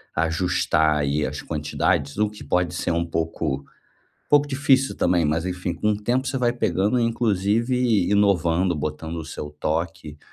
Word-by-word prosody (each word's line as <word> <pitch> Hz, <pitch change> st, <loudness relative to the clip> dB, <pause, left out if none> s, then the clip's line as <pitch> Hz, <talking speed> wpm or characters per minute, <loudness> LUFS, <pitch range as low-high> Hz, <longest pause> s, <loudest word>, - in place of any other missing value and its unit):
ajustar 80 Hz, -2 st, +1 dB
aí, 75 Hz, +1 st, 0 dB
as 75 Hz, +3 st, -5 dB
quantidades, 75 Hz, -1 st, -1 dB
o 105 Hz, 0 st, +2 dB
que 105 Hz, -5 st, -12 dB
pode 90 Hz, +3 st, 0 dB
ser -, -, -1 dB
um 85 Hz, 0 st, 0 dB
pouco 80 Hz, -3 st, -2 dB
um -, -, -28 dB, 0.5 s
pouco 145 Hz, 0 st, +4 dB
difícil 135 Hz, -1 st, +2 dB
também, 85 Hz, -2 st, +2 dB
mas 80 Hz, +3 st, 0 dB
enfim, 90 Hz, -1 st, -3 dB
com 105 Hz, +4 st, 0 dB
o 105 Hz, -, -1 dB
tempo 130 Hz, +4 st, 0 dB
você 135 Hz, -, -1 dB
vai 120 Hz, -1 st, +2 dB
pegando, 110 Hz, 0 st, +1 dB
inclusive 115 Hz, -1 st, +1 dB
inovando, 95 Hz, -3 st, +2 dB
botando 75 Hz, +2 st, -4 dB
o 80 Hz, -, -5 dB
seu 75 Hz, -1 st, -6 dB
toque. 80 Hz, -1 st, -3 dB
90 Hz, 165 wpm, -23 LUFS, 80-110 Hz, 0.5 s, pouco